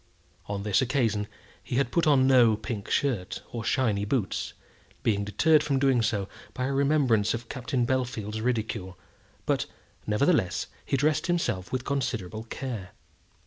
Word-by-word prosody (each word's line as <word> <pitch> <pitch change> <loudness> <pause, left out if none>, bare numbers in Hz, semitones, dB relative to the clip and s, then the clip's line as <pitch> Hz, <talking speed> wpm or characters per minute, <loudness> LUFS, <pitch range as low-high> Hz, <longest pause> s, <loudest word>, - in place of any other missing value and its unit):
On 100 -1 -3
this 105 +2 +2
occasion 115 -6 +1 0.3
he 130 +3 +1
put 155 +6 0
on 135 -3 +5
no 120 -5 +5
pink 110 -2 -5
shirt 120 -11 -1
or 115 -1 -4
shiny 110 -8 +1
boots, 105 -1 -1 0.5
being 100 -2 +1
deterred 150 - +4
from 145 -2 0
doing 135 -3 +3
so 105 -4 0 0.3
by 125 - -1
a 140 - -1
remembrance 135 -7 +3
of 120 0 -8
Captain 125 -1 -1
Bellfield's 120 -4 -2
ridicule; 110 -6 -2 0.5
but, - - 0 0.4
nevertheless, 105 - +2 0.2
he 135 - 0
dressed 150 +3 +1
himself 170 - -1
with 130 -1 -2
considerable 110 -6 -2
care. 115 -7 -6
120 Hz, 145 wpm, -27 LUFS, 105-135 Hz, 0.5 s, on